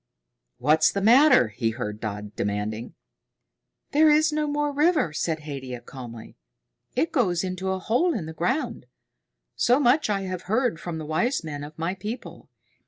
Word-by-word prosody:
"What's 150 Hz, +5 st, +4 dB
the 200 Hz, -, -2 dB
matter?" 240 Hz, -, +6 dB
he 115 Hz, +2 st, -1 dB
heard 110 Hz, -2 st, -5 dB
Dodd 105 Hz, -1 st, -6 dB
demanding. 105 Hz, +3 st, -3 dB, 1.0 s
"There 310 Hz, +2 st, +5 dB
is 305 Hz, +1 st, +4 dB
no 305 Hz, 0 st, 0 dB
more 295 Hz, 0 st, 0 dB
river," 300 Hz, -, +2 dB
said 160 Hz, 0 st, -2 dB
Haidia 135 Hz, -4 st, -6 dB
calmly. 120 Hz, -3 st, -10 dB, 0.6 s
"It 320 Hz, +7 st, +1 dB
goes 190 Hz, -, +1 dB
into 185 Hz, 0 st, -3 dB
a 190 Hz, -, 0 dB
hole 250 Hz, -, +1 dB
in 185 Hz, -8 st, -3 dB
the 160 Hz, -, -7 dB
ground. 240 Hz, -, -2 dB, 0.7 s
So 245 Hz, +3 st, +3 dB
much 275 Hz, 0 st, +3 dB
I 200 Hz, -1 st, 0 dB
have 185 Hz, -2 st, -4 dB
heard 230 Hz, -5 st, +1 dB
from 170 Hz, -1 st, -5 dB
the 155 Hz, -, -6 dB
wise 235 Hz, -, 0 dB
men 145 Hz, -2 st, -6 dB
of 150 Hz, +1 st, -10 dB
my 165 Hz, +3 st, -1 dB
people. 210 Hz, +6 st, -7 dB
185 Hz, 165 wpm, -25 LUFS, -, 1.0 s, matter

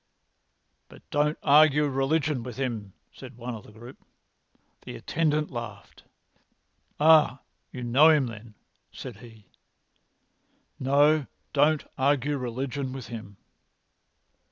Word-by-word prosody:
"But -, -, -17 dB
don't 150 Hz, +1 st, +1 dB
argue 150 Hz, 0 st, +5 dB
religion 140 Hz, 0 st, 0 dB
with 120 Hz, 0 st, -8 dB
him," 115 Hz, -7 st, -4 dB, 0.2 s
said 130 Hz, -2 st, -12 dB
one 125 Hz, 0 st, -6 dB
of 110 Hz, -, -9 dB
the -, -, -16 dB
group. 120 Hz, +4 st, -13 dB, 0.8 s
The -, -, -9 dB
attendant 150 Hz, -, -1 dB
laughed. 115 Hz, -5 st, -9 dB, 0.9 s
"Ah, 150 Hz, -4 st, +5 dB, 0.3 s
you 125 Hz, -, -7 dB
know 130 Hz, +7 st, +5 dB
him, 150 Hz, -4 st, +4 dB
then," 115 Hz, -2 st, -10 dB, 0.4 s
said 125 Hz, -5 st, -9 dB
he. 115 Hz, -3 st, -15 dB, 1.3 s
"No, 145 Hz, +2 st, +3 dB, 0.3 s
don't 150 Hz, +1 st, +3 dB, 0.2 s
argue 145 Hz, +1 st, +1 dB
religion 130 Hz, +2 st, -4 dB
with 135 Hz, -2 st, -8 dB
him." 110 Hz, -4 st, -9 dB
130 Hz, 110 wpm, -26 LUFS, 120-150 Hz, 1.3 s, argue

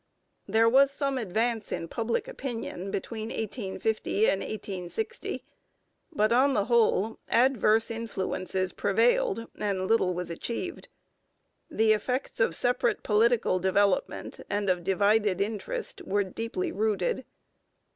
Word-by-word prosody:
There 220 Hz, +3 st, +4 dB
was 270 Hz, +4 st, +6 dB
some 275 Hz, -1 st, -1 dB
advance 225 Hz, +1 st, -1 dB
in 165 Hz, -, -3 dB
public 230 Hz, +5 st, -2 dB
opinion 225 Hz, -7 st, -5 dB
between 220 Hz, +3 st, -4 dB
1850 215 Hz, -1 st, -1 dB
and 195 Hz, -, -1 dB
1860, 210 Hz, -, -4 dB, 0.7 s
but, 215 Hz, -7 st, +2 dB
on 270 Hz, +3 st, +4 dB
the 205 Hz, -, +2 dB
whole, 225 Hz, -2 st, +2 dB
adverse 230 Hz, -3 st, +3 dB
influences 190 Hz, -4 st, -3 dB
prevailed 485 Hz, -, +2 dB
and 195 Hz, -3 st, -1 dB
little 185 Hz, -4 st, +2 dB
was 180 Hz, -1 st, -3 dB
achieved. 245 Hz, -, -5 dB, 0.8 s
The 220 Hz, 0 st, +3 dB
effects 250 Hz, +5 st, -2 dB
of 225 Hz, -8 st, +2 dB
separate 245 Hz, +2 st, +1 dB
political 220 Hz, -3 st, +3 dB
development 190 Hz, +1 st, 0 dB
and 205 Hz, -1 st, +1 dB
of 180 Hz, -1 st, -2 dB
divided 200 Hz, +1 st, +2 dB
interest 205 Hz, 0 st, -3 dB
were 205 Hz, +1 st, +1 dB
deeply 195 Hz, 0 st, -3 dB
rooted. 210 Hz, +3 st, 0 dB
220 Hz, 115 wpm, -28 LUFS, 195-235 Hz, 0.8 s, was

